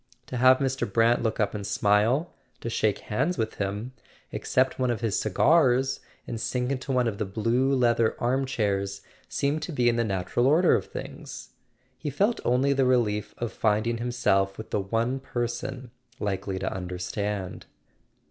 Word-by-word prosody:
To 125 - -5
have 130 +1 +6
Mr. 135 -5 -1
Brant 115 +3 +3
look 110 -2 -1
up 105 -2 +1
and 105 - -4
smile, 105 - +2 0.3
to 115 - -4
shake 110 -2 +1
hands 135 +12 +1
with 110 -1 -2
him, 105 +5 -3 0.4
accept 130 +1 +1
one 130 -1 +1
of 120 -2 -1
his 105 -5 0
cigars, 130 - +3 0.3
and 115 -2 -5
sink 125 +1 -1
into 135 0 -3
one 125 -2 +2
of 100 -3 -3
the 105 - 0
blue 115 +7 +1
leather 120 -3 +2
arm 130 +3 +1
chairs, 100 -5 -1 0.3
seemed 145 +3 0
to 170 - -4
be 125 -5 +1
in 120 - 0
the 120 - +2
natural 100 +4 0
order 165 +6 +5
of - - 0
things. - - -8 0.5
He 145 - -3
felt 205 - +1
only 130 +3 +3
the 135 -1 +2
relief 105 -5 +1
of 120 -2 -4
find¬ 105 0 +1
ing 115 0 -1
himself 100 -5 +1
with 110 - -9
the 105 - +1
one 115 +6 -1
person 125 0 -4 0.3
likely 95 -1 -2
to - - -2
understand. 90 +2 -4
120 Hz, 175 wpm, -27 LUFS, 105-130 Hz, 0.5 s, have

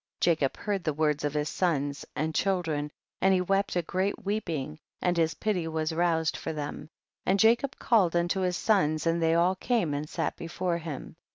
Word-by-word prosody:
9. 175 - +6
Jacob 150 -5 0
heard 205 -3 -2
the 155 -3 -1
words 150 -1 +1
of 145 0 -1
his 150 0 0
sons' 145 -6 -1
and 155 +2 -1
children, 160 -6 0 0.3
and 190 0 +5
he - - +2
wept 195 +2 0
a 175 - +1
great 195 +6 -2
weeping, 160 -8 -2 0.2
and 180 -1 +1
his 165 -1 +1
pity 190 -6 -1
was 160 0 -1
roused 165 -1 +1
for 160 - -4
them, 150 0 -5 0.3
and 195 +2 +2
Jacob 240 +5 +3
called 195 -8 +3
unto' 175 +2 +1
his 180 -1 0
sons 155 -8 +2
and 165 0 +1
they 165 0 +3
all 175 +2 +4
came 190 - 0
and 145 +2 -3
sat - - -2
before 170 +1 -2
him 155 -5 -7
170 Hz, 195 wpm, -28 LUFS, 155-190 Hz, 0.3 s, 9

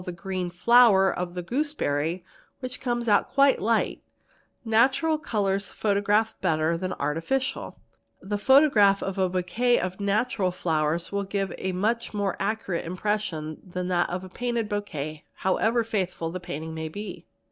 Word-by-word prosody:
the 180 - -5
green 185 0 -4
flower 195 +1 +5
of 180 0 -4
the 180 - -4
gooseberry 175 - -1 0.3
which 255 -1 -6
come 240 -2 -1
out 205 -2 +3
quite 275 0 +4
light; 225 +2 +1 0.6
natural 265 +8 +3
colours 200 -7 -1
otograph 210 +1 +1
better 160 +1 +1
than 185 +2 -3
artificial; 165 - -2 0.4
the 205 +2 -4
photograph 210 -4 +5
of 195 0 -3
a 185 -1 +2
bouquet 225 +7 +1
of 185 +1 -4
natural 205 -1 +1
flowers 165 -2 -1
will 200 0 -1
give 195 0 -2
a 190 - -2
much 220 +5 -1
more 200 -3 0
accurate 215 -5 -2
impression 180 -4 -3
than 180 -1 -4
that 175 -1 +1
of 180 +1 -4
a 185 - -9
painted 235 +2 -2
bow 205 0 -1
quet 155 -5 -6
however 225 +5 +1
faithful 185 -7 -2
the 185 - -4
painting 160 -3 -6
may 160 0 -4
be. 205 +2 -8
195 Hz, 155 wpm, -26 LUFS, 175-225 Hz, 0.6 s, flower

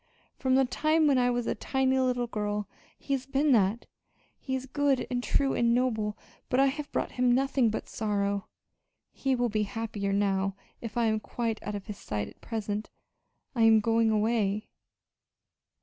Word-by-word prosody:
From 260 -1 +1
the 265 0 +5
time 310 +5 +2
when 275 -3 +4
I 245 0 +3
was 245 -1 0
a - - 0
tiny 265 +3 +1
little 250 -1 +1
girl 210 -3 -3 0.3
he 275 - -3
has 265 -1 -2
been 280 +2 +2
that. 215 -1 +3 0.5
He 265 - -3
is 260 0 -4
good 280 0 +1
and 245 0 -1
true 275 +1 +1
and 235 0 +3
noble, 220 -4 0 0.3
but 250 - +2
I 275 - +6
have 290 +2 -2
brought - - -1
him 250 -1 +2
nothing 270 -2 +2
but 215 - -4
sorrow. 200 -2 -1 0.6
He 270 -1 0
will 245 -1 +1
be 215 0 0
happier 205 -1 -3
now 195 -1 +1 0.3
if 230 -1 -6
I 235 - +3
am 220 -1 +2
quite 225 0 -3
out 210 - -4
of 200 - -6
his 210 -2 -7
sight 105 -1 -3
at - - -15
present. 215 -2 -3 0.6
I 240 - -1
am 225 -1 +7
going 225 +1 +2
away." 215 -1 +1
230 Hz, 180 wpm, -29 LUFS, 210-260 Hz, 0.6 s, am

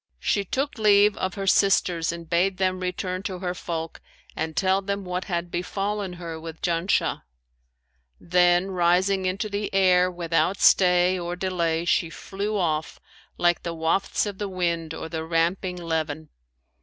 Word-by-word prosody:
She 200 - 0
took 270 +6 -3
leave 205 -1 +5
of 185 -1 -2
her 195 - -4
sisters 180 -4 +3
and 170 -1 -8
bade 180 +3 +1
them 185 -1 0
return 185 0 -3
to 190 -2 -4
her 180 -1 -3
folk 165 -2 -5 0.3
and 160 -1 -4
tell 190 0 +2
them 200 0 -3
what 180 +1 -3
had 175 -3 -3
befallen 195 +2 -3
her 170 -2 -7
with 160 0 -8
Janshah; 170 +2 0 1.0
then, 180 +2 +3
rising 185 +2 +2
into 195 +4 -2
the 205 0 -3
air 185 -1 +4
without 175 +2 0
stay 180 0 +4
or 175 0 -4
delay 170 -3 -1
she 170 -1 +2
flew 200 +5 -4
off, 160 -4 -1 0.4
like 175 -1 +2
the 170 -1 -4
wafts 165 +7 0
of 205 -2 -6
the 205 -1 -3
wind 170 -3 -2
or - - -6
the 160 -1 -4
ramping 170 +3 0
leven. 160 -2 -3
180 Hz, 155 wpm, -25 LUFS, 170-195 Hz, 1.0 s, leave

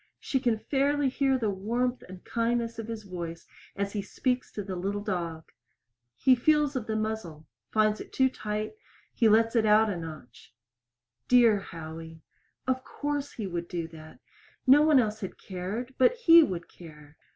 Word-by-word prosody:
She 265 - -1
can 240 -4 +1
fairly 280 +3 +1
hear 270 0 +1
the 220 -5 0
warmth 240 +6 -1
and 185 -1 -11
kindness 230 0 -1
of 225 - -5
his 225 -1 -6
voice 170 -3 -7 0.3
as 200 0 -2
he 210 - -1
speaks 250 +5 -2
to 205 - -4
the 190 -1 -5
little 200 +3 -3
dog. 170 -6 -4 0.6
He 260 - +4
feels 295 +3 +2
of 245 -4 -3
the 220 - -1
muzzle 215 -8 -4 0.2
finds 215 0 +2
it - - -10
too 265 - +3
tight; 215 -4 -4 0.4
he 225 - +3
lets 225 +2 +4
it 225 - +4
out 215 0 +4
a 185 - -3
notch. 155 -9 -10 0.7
Dear 235 -4 +5
Howie. 160 -2 -9 0.4
Of 260 0 -1
course 290 0 -4
he 215 - -5
would 170 -2 -4
do 170 -2 -4
that. 160 -1 -13 0.5
No 275 +3 +7
one 305 -2 +5
else 215 -2 0
had 190 - -6
cared, 200 +7 -5
but 260 - +5
he 335 -9 +7
would 180 - -2
care. 150 -3 -14
215 Hz, 175 wpm, -28 LUFS, 180-250 Hz, 0.7 s, No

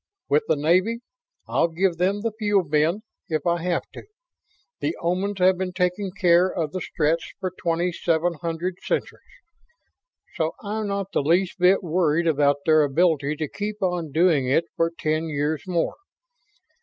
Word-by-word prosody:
With 145 +2 +4
the 160 - +3
Navy, 185 +10 +2 0.5
I'll - - +2
give 170 +1 -1
'em 195 +3 +1
the 230 +1 -1
Fuel 205 -3 +2
Bin 155 +6 +1 0.3
if 155 -3 -1
I 170 -1 +1
have 175 0 0
to. - - -8 0.8
The 325 - -2
Omans 185 +4 -1
have 185 0 +3
been 185 -1 -3
taking 180 +2 0
care 180 -1 +4
of 160 -4 -2
the 185 - -4
Stretts 160 +1 -1
for 185 - -3
twenty 175 0 -1
seven 170 +1 0
hundred 170 +2 -3
centuries, - - -3 1.1
so 160 0 -1
I'm 215 +1 -3
not 200 -1 -3
the - - +1
least 175 +6 +1
bit 185 +2 +4
worried 170 -1 +1
about 145 -3 +2
their 155 -1 +5
ability 150 0 +2
to 155 0 -3
keep 210 +6 -5
on 175 -4 -1
doing 160 -4 +3
it 160 +6 +2
for 165 0 +1
ten 155 +1 -1
years 150 0 -2
more. 175 -2 0
170 Hz, 165 wpm, -24 LUFS, 155-185 Hz, 1.1 s, their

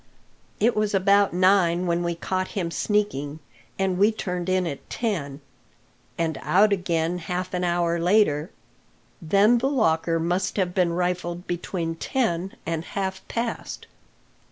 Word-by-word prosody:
"It 230 +3 +3
was 210 -1 +1
about 200 +1 +4
nine 185 -1 +3
when 170 0 0
we 170 -1 -1
caught 185 +2 -2
him 170 -3 -1
sneaking, 155 -9 -1 0.4
and 190 -2 0
we 205 +3 +5
turned 180 -4 -4
in 185 -1 +2
at 145 -5 -6
ten." 155 - -3 0.8
"And 165 -1 -1
out 205 +3 +4
again 175 -2 -1
half 180 +2 -4
an 180 0 -1
hour 170 -1 +1
later. 175 -4 +2 0.7
Then 200 +8 +4
the 265 +3 +1
locker 165 - +1
must 180 +4 -1
have 180 -3 0
been 175 -2 +2
rifled 175 0 -2
between 175 -1 -3
ten 185 -1 -1
and 165 -1 -2
halfpast. 195 +6 -4
180 Hz, 135 wpm, -24 LUFS, 170-200 Hz, 0.8 s, we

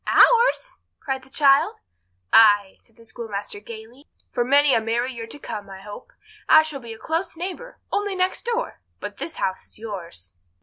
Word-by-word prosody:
"Ours!" - - +4 0.2
cried 265 -1 -3
the 260 - -18
child. 275 0 +4 0.6
"Ay," 205 -3 +5
said 225 - -28
the 230 - -18
schoolmaster 205 -3 -6
gaily, 230 +5 -12 0.2
"for 240 - 0
many 280 +2 +4
a 225 - +3
merry 235 +3 -1
year 230 -1 -7
to 230 - -8
come, 210 -7 -7
I 190 0 -10
hope. 205 - -11 0.4
I 315 0 +8
shall 310 -3 -6
be 235 -3 -10
a - - -11
close 325 +6 -3
neighbour—only 405 +1 -4
next 370 +4 -1
door; 480 +1 -2 0.2
but - - -7
this 330 - -5
house 190 0 -3
is - - -15
yours." 170 - -8
240 Hz, 175 wpm, -23 LUFS, 215-315 Hz, 0.6 s, I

